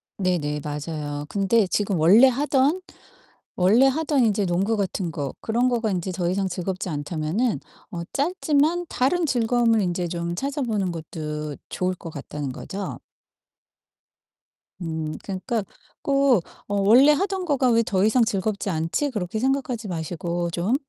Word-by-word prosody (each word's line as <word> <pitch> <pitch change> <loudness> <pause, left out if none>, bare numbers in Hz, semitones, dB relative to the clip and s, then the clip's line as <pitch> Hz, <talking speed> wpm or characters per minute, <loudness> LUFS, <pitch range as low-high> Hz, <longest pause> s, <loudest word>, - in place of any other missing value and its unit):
네네 160 -6 -1
맞아요. 150 -1 -4
근데 200 +1 +2
지금 200 -3 0
원래 205 +11 +7
하던 285 +5 +2 0.7
원래 210 +9 +5
하던 290 -2 +2
인제 205 -2 +1
농구 195 +6 +1
같은 190 -3 -2
거 145 -4 -4
그런 240 +3 +1
거가 230 -3 0
인제 185 0 -2
더이상 185 +2 -1
즐겁지 185 +1 -3
않다면은 160 - -1 0.3
어 170 -3 -4
짧지만 320 +1 +1
다른 330 +7 +1
즐거움을 235 -4 +2
인제 175 -1 -1
좀 170 0 -3
찾아보는 235 - -1
것도 150 -2 -5
좋을 185 0 -1
것 170 - -9
같다는 140 -1 -5
거죠. 195 +8 -6 1.8
음 160 -2 -3
그러니까 210 +4 -2 0.4
꼭 275 -6 +3 0.3
어 205 - 0
'원래 250 +9 +7
하던 380 +3 -1
거가 275 -5 +2
왜 230 0 +4
더 190 -3 +1
이상 235 +3 +4
즐겁지 205 -2 -1
않지?' 165 - -1
그렇게 210 -1 -3
생각하지 255 -4 -1
마시고 170 0 -3
좀 180 +9 0
200 Hz, 285 characters per minute, -24 LUFS, 170-250 Hz, 1.8 s, 원래